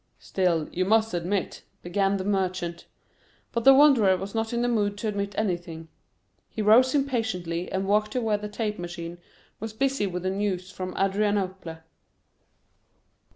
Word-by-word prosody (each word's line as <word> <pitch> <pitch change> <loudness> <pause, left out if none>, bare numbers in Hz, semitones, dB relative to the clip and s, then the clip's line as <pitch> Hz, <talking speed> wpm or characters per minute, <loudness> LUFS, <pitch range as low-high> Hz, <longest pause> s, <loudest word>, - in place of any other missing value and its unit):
"Still, 170 -5 0
you 185 - 0
must 220 +2 +2
admit—" 180 +3 -2 0.2
began 195 +2 +1
the 190 - -4
Merchant. 185 -4 -2 0.6
But 235 -1 -2
the 270 - +10
Wanderer 255 -10 +5
was 195 +2 -6
not 225 0 -1
in 235 0 0
the - - +1
mood 205 -4 0
to 220 - -3
admit 200 -1 -3
anything. 175 -5 -3 0.6
He 215 - -4
rose 250 +6 +5
impatiently 220 -11 -1
and 190 0 -1
walked 210 +1 +1
to 255 - 0
where 215 -2 0
the 210 0 -6
tape 210 -1 -3
machine 175 0 -6 0.4
was 220 0 -6
busy 270 -2 0
with 180 -1 -4
the 185 - 0
news 190 -2 -2
from 185 -1 -6
Adrianople. 195 -4 -1
200 Hz, 155 wpm, -26 LUFS, 180-220 Hz, 0.6 s, the